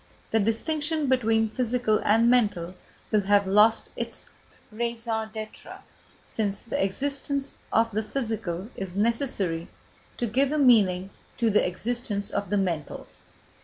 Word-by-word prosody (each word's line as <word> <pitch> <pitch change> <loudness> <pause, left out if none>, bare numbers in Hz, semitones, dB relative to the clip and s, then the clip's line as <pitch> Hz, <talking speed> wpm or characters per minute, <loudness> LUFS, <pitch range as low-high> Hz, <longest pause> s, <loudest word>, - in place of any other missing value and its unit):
The 225 - +3
distinction 300 +8 0
between 225 -3 +2
physical 240 -1 0
and 225 +3 +4
mental 205 -8 +2 0.4
will 215 -2 +3
have 200 0 +3
lost 210 +4 +4
its - - -4 0.4
raison 230 -1 -2
d'être, 215 0 -8 0.5
since 200 -3 -2
the 230 - -1
existence 275 +6 0 0.2
of 230 +1 +2
the 215 +1 -1
physical 215 -5 -3
is 190 -2 -6
necessary 205 -6 0 0.5
to 245 - -1
give 260 +5 +1
a 305 - 0
meaning 200 -9 +4 0.3
to 230 -2 +2
the 210 - +3
existence 205 +1 -1
of 200 -2 -2
the 205 - +1
mental. 170 -6 -2
220 Hz, 130 wpm, -26 LUFS, 200-245 Hz, 0.5 s, and